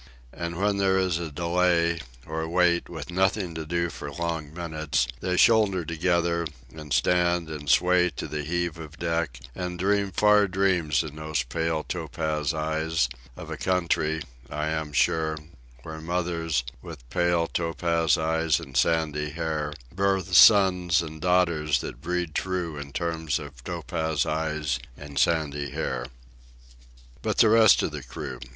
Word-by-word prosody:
And 85 0 -5
when 100 0 +1
there 95 -1 +2
is 90 -3 +1
a 85 -2 -4
delay, 85 +1 +1 0.3
or 80 0 -4
wait, 85 0 +2
with - - -7
nothing 95 0 +1
to 80 -1 -6
do 85 +1 -1
for 70 0 -7
long 80 -1 -3
minutes, 80 -6 -1
they 90 0 -1
shoulder 105 -6 +4
together, 85 0 0 0.3
and 75 -2 -10
stand 85 -1 +2
and 75 -2 -6
sway 90 +4 +4
to - - -4
the 75 +1 -3
heave 85 +1 -2
of 80 -1 -10
deck, 85 -6 -2
and 90 +2 -4
dream 100 +2 +1
far 105 +2 +4
dreams 90 -5 +1
in 75 -1 -8
those 75 -4 -1
pale, 80 +4 -2
topaz 80 -1 -2
eyes, 80 -3 0 0.3
of - - -8
a - - -4
country, 85 -4 0 0.3
I 75 +1 -2
am 80 -1 -3
sure, 80 +2 +1 0.5
where 80 0 -7
mothers, 85 -5 -1 0.2
with 75 -7 -10
pale, 85 +2 +2
topaz 85 -2 +1
eyes 80 -1 +1
and - - -11
sandy 75 -2 +1
hair, 80 -1 -2 0.2
birth 95 0 0
sons 90 -4 +6
and 80 -1 -8
daughters 85 -4 +2
that - - -7
breed 90 -1 -2
true 90 -3 -2
in 70 -1 -7
terms 80 -1 -1
of 70 -5 -10
topaz 80 +1 -2
eyes 75 -3 -1 0.2
and 70 -2 -5
sandy 75 -3 +1
hair. - - -3 1.1
But - - -2
the 110 - +6
rest 110 -2 +6
of - - -1
the - - -6
crew! - - -7
80 Hz, 150 wpm, -26 LUFS, 75-90 Hz, 1.1 s, sons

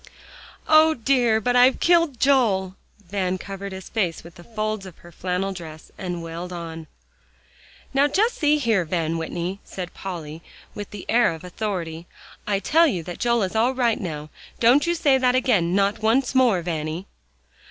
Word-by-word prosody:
"O 315 0 +6
dear! 240 -2 +2
but 245 +3 0
I've 250 +1 +5
killed 335 -7 +3
Joel." 210 -9 +2 0.4
Van 185 -2 -1
covered 195 +1 -7
his 190 0 -8
face 185 -7 -2
with 170 +1 -13
the 175 - -14
folds 215 -1 -3
of 180 - -13
her 175 - -15
flannel 185 +3 -2
dress 160 -4 -10
and 175 -2 -5
wailed 165 +2 -6
on. 165 -2 -7 1.1
"Now, 275 +2 +4
just 425 - +2
see 300 -1 +3
here, 225 -9 +1
Van 165 -1 -2
Whitney," 175 +4 -4
said 180 -2 -7
Polly, 165 -4 -7 0.3
with 205 -1 -7
the 205 -2 -9
air 230 -6 +3
of 160 - -13
authority, 180 -4 -4 0.4
"I 205 -1 +1
tell 325 - +4
you 185 - -2
that 175 +1 -8
Joel 235 -2 +2
is 190 +3 -3
all 240 +4 +2
right 240 -3 +1
now. 155 -4 -6 0.3
Don't 260 +7 +4
you 345 - +1
say 285 -5 +3
that 250 -1 +2
again 200 -9 +2
not 200 +1 +1
once 230 +5 +1
more, 240 -9 +3
Vanny." 160 +1 -3
195 Hz, 175 wpm, -23 LUFS, 175-245 Hz, 1.1 s, O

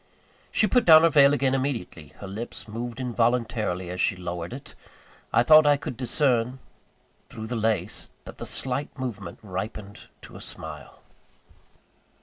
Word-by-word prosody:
She - - +3
put 245 +2 +3
down 160 -1 +9
her 165 - +5
veil 140 -1 +6
again 135 -2 +1
immediately; 130 - -3
her 100 - -6
lips 105 +2 -6
moved 115 +3 -6
involuntarily 115 -7 -1
as 90 0 -3
she - - +2
lowered 90 -1 -5
it: 130 +3 -9 0.6
I - - +4
thought 155 +3 +7
I 145 -1 +5
could 130 - -6
discern, 125 0 +1 0.7
through 110 - -7
the 120 +2 -4
lace, 110 -1 -1
that - - -11
the - - -6
slight 135 +3 -2
movement 105 -9 -6
ripened 100 +1 -7
to - - -12
a - - -10
smile. 75 -5 -8
115 Hz, 150 wpm, -25 LUFS, 100-135 Hz, 0.7 s, down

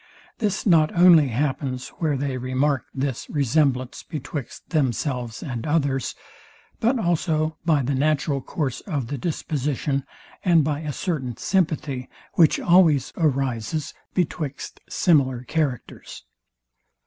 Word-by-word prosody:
This 210 -4 -1
not 160 -6 +5
only 170 -4 +7
happens, 130 0 -2
where 155 -4 +1
they 135 -1 -2
remark 130 +2 0
this 135 -2 -3
resemblance 135 -2 +1
betwixt 145 -3 -7
themselves 125 - -1
and 125 -2 -4
others, 140 -5 0 0.6
but 240 +4 +2
also 160 -5 0
by 150 -4 +3
the 135 +3 -1
natural 145 0 +1
course 135 -2 -3
of 140 - -2
the 145 - -3
disposition, 145 -3 -2 0.4
and 170 -4 +5
by 145 0 -1
a 155 -2 -4
certain 135 - -3
sympathy, 155 -8 -1 0.2
which 160 -3 +4
always 170 -6 +4
arises 135 -1 -1 0.2
betwixt 155 -6 -3
similar 130 -8 +2
characters. 140 -2 -3
145 Hz, 115 wpm, -24 LUFS, 130-160 Hz, 0.6 s, only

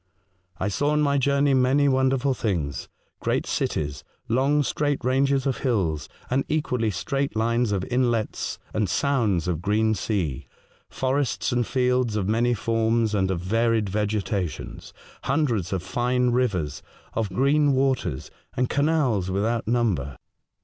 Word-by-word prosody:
I 95 - -1
saw, 145 +9 0
on 150 0 +2
my 140 -1 +2
journey, 140 +1 +2
many 135 +2 +3
wonderful 130 0 +2
things 80 - -2 0.2
— - - -45
great - - 0
cities; 75 -2 -2 0.2
long, 140 +5 +2
straight 145 -2 -1
ranges 135 +1 +2
of 135 -4 -1
hills, 95 - -1 0.2
and 130 +2 +1
equally 125 -7 0
straight 135 +7 -2
lines 115 +1 +1
of 95 -2 0
inlets 120 -3 -1 0.2
and 105 -3 0
sounds 110 - +1
of 85 -3 -1
green 110 +3 +2
sea; 80 - -2 0.4
forests 135 0 -1
and 120 -1 0
fields 125 -3 +1
of 100 -3 -1
many 120 +3 +2
forms 115 0 +1
and 95 -2 +1
of 90 -3 -1
varied 115 +2 +1
vegetations; 105 -3 -3 0.3
hundreds 125 - 0
of 95 -3 -2
fine 125 +5 +1
rivers, 105 -11 0 0.3
of 110 -3 -1
green 140 +7 +3
waters, 130 - 0 0.3
and 125 0 +1
canals 140 - +1
without 110 +4 -1
number. 100 - 0
115 Hz, 140 wpm, -25 LUFS, 100-130 Hz, 0.4 s, many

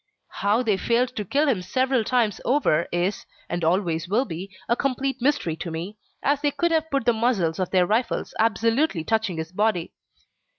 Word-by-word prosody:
How 210 +5 +1
they 215 -5 +1
failed 245 +4 +1
to 210 - -2
kill 285 - +1
him 230 -10 +1
several 255 +6 +1
times 225 -4 +1
over 245 - +2
is, 175 +4 -1 0.2
and 175 0 -3
always 170 -1 0
will 235 +7 +2
be, 180 0 -6 0.2
a 235 - +3
complete 270 0 -1
mystery 265 - +1
to 170 - -5
me, 170 +6 -5 0.3
as 285 +1 +2
they 295 - +2
could 340 +4 0
have 320 -1 +1
put 275 -5 -1
the 240 - +4
muzzles 220 -8 0
of 185 - -1
their 185 -2 +3
rifles 220 +5 -1
absolutely 225 - +2
touching 220 -3 0
his 160 +1 -5
body. 195 -3 0
220 Hz, 185 wpm, -24 LUFS, 180-255 Hz, 0.3 s, the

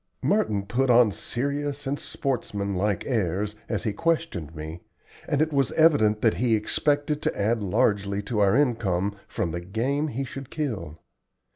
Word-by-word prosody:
Merton 110 - +1
put 125 +6 0
on 120 -3 +6
serious 140 +6 -2
and 140 +2 -2
sportsman 105 -7 -2
like 100 0 0
airs 105 -3 0 0.2
as - - -1
he 105 - -1
questioned 155 - -1
me, 80 +2 -7 0.5
and 145 +1 +3
it 155 -1 -3
was 135 -2 +2
evident 135 -10 +4
that 110 -7 +3
he 115 +1 +3
expected 145 +7 0
to - - -2
add 110 +3 +1
largely 100 0 +1
to 105 +1 -2
our 100 +1 +4
income 100 -8 +1
from 85 - -2
the 85 +1 -4
game 125 - -1
he 135 -1 -3
should 135 0 -7
kill. 105 - -4
115 Hz, 160 wpm, -26 LUFS, 100-140 Hz, 0.5 s, on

